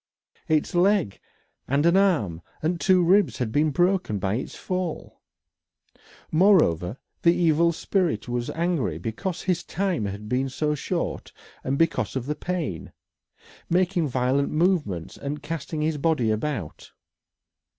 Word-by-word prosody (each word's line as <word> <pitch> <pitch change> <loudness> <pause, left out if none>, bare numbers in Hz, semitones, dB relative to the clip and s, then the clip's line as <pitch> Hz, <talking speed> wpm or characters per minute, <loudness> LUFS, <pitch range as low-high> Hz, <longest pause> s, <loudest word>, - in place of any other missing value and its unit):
Its 155 -1 +1
leg 180 - +2 0.5
and 140 +3 +1
an 170 +1 +5
arm 155 - +2 0.2
and 170 +2 0
two 185 -2 +4
ribs 195 +4 +3
had 120 -5 -2
been 150 +5 +2
broken 175 - +1
by 95 0 -1
its 125 - -4
fall. 185 -3 -4 1.1
Moreover, 155 - +3 0.2
the 170 0 +4
evil 170 0 +3
spirit 170 - -1
was 120 0 -2
angry 165 - -1
because 170 - -4
his 180 -2 0
time 185 - -1
had 100 +2 -6
been 130 +4 0
so 150 +3 -1
short 170 +4 -3 0.3
and 135 +1 -1
because 165 -2 +1
of 130 -2 -2
the 150 - -1
pain 155 - -4 0.8
making 175 -1 +2
violent 130 +2 +1
movements 155 - 0
and 145 +1 -5
casting 155 0 -4
his 155 -1 -1
body 140 -8 +2
about. 110 - -4
155 Hz, 135 wpm, -25 LUFS, 125-175 Hz, 1.1 s, an